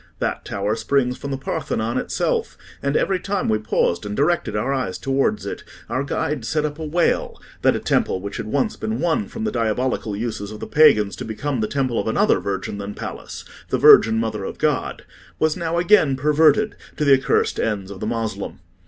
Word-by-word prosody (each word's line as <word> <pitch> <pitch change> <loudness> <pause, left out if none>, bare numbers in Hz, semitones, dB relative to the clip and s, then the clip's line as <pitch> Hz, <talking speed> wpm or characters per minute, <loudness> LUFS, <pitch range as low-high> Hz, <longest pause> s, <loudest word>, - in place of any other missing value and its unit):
That - - -2
tower 100 +2 -1
springs 125 +1 +1
from 140 - -7
the 135 - -2
Parthenon 120 -2 -2
itself; - - -1 0.2
and 140 +1 +1
every 190 -2 +1
time 200 0 -2
we 110 -1 +2
paused 105 -4 0
and 105 0 -5
directed 145 -7 +1
our 120 +6 0
eyes 125 -9 -2
towards 135 +1 0
it, - - -5 0.3
our 130 - -1
guide 140 -1 -2
set 150 +6 0
up 150 +1 -4
a - - -4
wail, 170 +3 0 0.2
that - - +4
a - - -1
temple 95 - +1
which 100 +2 -6
had - - -5
once 135 +4 0
been 110 +2 -3
won 175 +6 0
from 225 - -6
the 220 - 0
diabolical 115 -1 -1
uses 110 -2 -4
of 105 0 -8
the - - -5
pagans 105 -10 +4
to - - -5
become 125 +4 -3
the 110 - 0
temple 130 -3 -1
of - - -2
another - - +3
virgin 100 +1 -4
than 100 0 -6
Pallas—the - - -6
Virgin 110 0 +7
Mother 110 -1 -2
of - - -5
God—was 155 -1 -2
now 170 -1 -2
again 175 -6 +4
perverted 155 +10 +3 0.2
to 150 - 0
the 140 - +6
accursed 130 -1 +2
ends 100 -3 -2
of 95 - -8
the 105 - -3
Moslem. 115 -1 -3
125 Hz, 195 wpm, -22 LUFS, 110-150 Hz, 0.3 s, Virgin